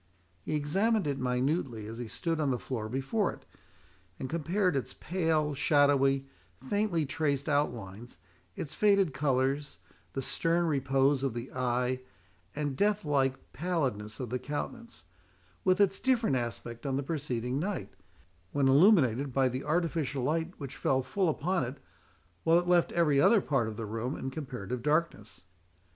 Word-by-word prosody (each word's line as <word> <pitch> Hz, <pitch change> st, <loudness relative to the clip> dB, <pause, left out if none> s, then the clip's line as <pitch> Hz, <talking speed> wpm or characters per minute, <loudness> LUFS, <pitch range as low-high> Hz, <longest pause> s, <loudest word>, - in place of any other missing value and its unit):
He 155 Hz, -, -3 dB
examined 195 Hz, +8 st, +1 dB
it 140 Hz, -2 st, -1 dB
minutely 125 Hz, -2 st, -1 dB
as 115 Hz, +2 st, -7 dB
he 120 Hz, -, -4 dB
stood 165 Hz, +7 st, -2 dB
on 150 Hz, -3 st, +1 dB
the 125 Hz, -, +1 dB
floor 110 Hz, 0 st, -4 dB
before 135 Hz, -, 0 dB
it, -, -, -15 dB, 0.7 s
and 130 Hz, -, -4 dB
compared 175 Hz, +2 st, +1 dB
its 135 Hz, -, -3 dB
pale, 160 Hz, -4 st, 0 dB
shadowy, 135 Hz, -1 st, +3 dB, 0.3 s
faintly 175 Hz, +2 st, 0 dB
traced 145 Hz, 0 st, -1 dB
outlines, 120 Hz, -, -2 dB, 0.4 s
its 145 Hz, -, -5 dB
faded 200 Hz, -7 st, +3 dB
colours, 135 Hz, +1 st, 0 dB, 0.4 s
the 135 Hz, -, -3 dB
stern 170 Hz, +5 st, +1 dB
repose 135 Hz, -2 st, +2 dB
of 135 Hz, -4 st, -1 dB
the 120 Hz, +2 st, -5 dB
eye, 125 Hz, 0 st, 0 dB, 0.6 s
and 145 Hz, -2 st, -2 dB
death 205 Hz, +3 st, +1 dB
like 135 Hz, -2 st, 0 dB
pallidness 130 Hz, -, -2 dB
of 125 Hz, -3 st, -5 dB
the 125 Hz, -, -1 dB
countenance, 235 Hz, -, -6 dB, 0.6 s
with 185 Hz, +1 st, +3 dB
its 195 Hz, -1 st, +3 dB
different 240 Hz, -, +2 dB
aspect 120 Hz, 0 st, -4 dB
on 135 Hz, -1 st, 0 dB
the 140 Hz, -, -1 dB
preceding 130 Hz, -4 st, -2 dB
night, 195 Hz, +4 st, -3 dB, 0.6 s
when 140 Hz, -2 st, +3 dB
illuminated 140 Hz, -, +5 dB
by 130 Hz, 0 st, +2 dB
the 130 Hz, +2 st, -4 dB
artificial 155 Hz, -5 st, 0 dB
light 160 Hz, +5 st, -1 dB
which 140 Hz, -3 st, -6 dB
fell 130 Hz, -1 st, +1 dB
full 175 Hz, +7 st, 0 dB
upon 175 Hz, +2 st, 0 dB
it, 125 Hz, +3 st, -5 dB, 0.7 s
while 165 Hz, +1 st, +5 dB
it 175 Hz, 0 st, 0 dB
left 175 Hz, -1 st, +3 dB
every 150 Hz, -5 st, +3 dB
other 230 Hz, +6 st, +6 dB
part 135 Hz, -, 0 dB
of 110 Hz, -1 st, -6 dB
the 115 Hz, -, -4 dB
room 115 Hz, +5 st, -3 dB
in 135 Hz, -, -4 dB
comparative 125 Hz, -5 st, -5 dB
darkness. 150 Hz, -7 st, -1 dB
140 Hz, 155 wpm, -30 LUFS, 130-165 Hz, 0.7 s, other